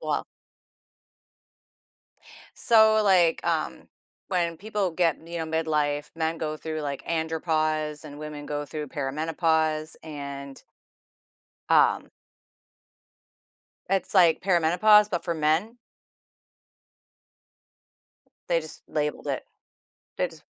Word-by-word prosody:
well - - -1 2.3
So, 220 -1 +6
like, 180 -4 +3
um, - - -2 0.4
when 170 -3 -1
people 205 -2 -2
get, 165 -2 0
you 170 0 -5
know, 160 - -2
midlife, 150 -2 -1
men 160 0 -1
go 155 -1 -3
through, 155 0 -4
like, 140 -2 -5
andropause 155 -2 -1
and 145 -1 -10
women 150 -1 -7
go 145 0 -3
through 150 0 -6
perimenopause, 155 +2 0
and 140 -3 -7 1.1
um - - +3 1.8
it's 195 +1 +1
like 175 -4 +5
perimenopause, 195 +4 +4
but 175 -4 -2
for 170 - -1
men. 160 +9 0 2.7
They 170 -1 +3
just 155 -1 -8
labeled 150 -1 -2
it. - - -2 0.7
They - - +1
just - - -16
160 Hz, 100 wpm, -26 LUFS, 150-175 Hz, 2.7 s, So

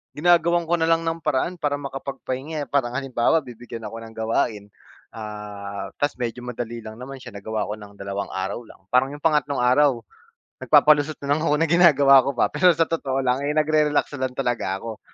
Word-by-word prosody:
ginagawan 170 +2 +3
ko 170 +1 0
na 165 - +2
lang 165 0 +2
ng 165 0 -2
paraan 155 +3 -1
para 145 -1 0
makapagpahinga 140 +1 -5
eh. - - -9
Parang 125 -3 0
halimbawa 135 +3 +1
bibigyan 120 -2 -9
ako 115 +2 -6
ng 115 0 -11
gawain, 110 -2 -1 0.4
ah 105 -2 -7
tapos 145 - 0
medyo 120 -1 -4
madali 120 -1 -5
lang 110 -1 -9
naman 130 +3 -9
siya 120 -4 -11
nagawa 110 +2 -3
ko 105 - -4
ng 105 -1 -14
dalawang 100 0 -4
araw 95 +5 -4
lang 115 - -16
parang 125 +1 +4
'yung 145 0 -10
pangatlong 150 -4 +1
araw, 130 0 +4 0.6
nagpapalusot 150 0 +4
na 140 - +2
lang 155 - 0
ako 150 -2 +2
na 165 - +2
ginagawa 145 -6 +6
ko 140 - -1
pa. - - +4
Pero 180 - +5
sa 165 - +4
totoo 135 -5 -1
lang 125 +1 +1
eh 150 - 0
nagre-relax 150 -1 +2
lang 130 -1 -1
talaga 120 -7 -1
ako. 110 +1 -8
130 Hz, 195 wpm, -23 LUFS, 115-150 Hz, 0.6 s, ginagawa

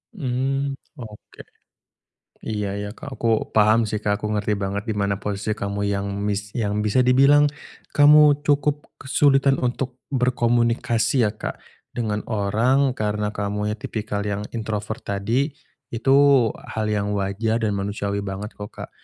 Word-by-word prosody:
Mmm, 135 -2 -1 0.2
oke. 110 -4 -11 1.0
Iya 105 -2 -3
iya 105 - -4
Kak, 140 - -9
aku 115 -2 0
paham 110 +2 +4
sih 105 0 -2
Kak. 105 -1 -1
Aku 105 0 -2
ngerti 105 0 0
banget 100 +1 -3
di 110 - -1
mana 100 -1 -1
posisi 100 +1 -3
kamu 100 -1 -3
yang 100 0 -1 0.2
mis 105 +1 -3
yang 105 -3 -1
bisa 125 +5 +3
dibilang 140 +3 +5 0.4
kamu 150 0 +6
cukup 145 0 +1
kesulitan 135 0 +3
untuk 125 0 -2
berkomunikasi 120 -1 +1
ya 105 - -2
Kak, - - -6 0.3
dengan 105 -3 -2
orang 120 +6 +2
karena 105 -1 -2
kamu 105 +1 -2
yang 110 - -10
tipikal 105 -2 -3
yang 100 0 -2
introvert 110 -1 -4
tadi, 115 +9 -1 0.4
itu 130 +4 +2 0.5
hal 110 -1 -3
yang 105 -1 -1
wajar 105 +3 -1
dan 110 -3 0
manusiawi 100 0 -2
banget 100 +2 -6
kok 105 0 -8
Kak. - - -9
110 Hz, 145 wpm, -23 LUFS, 105-125 Hz, 1.0 s, kamu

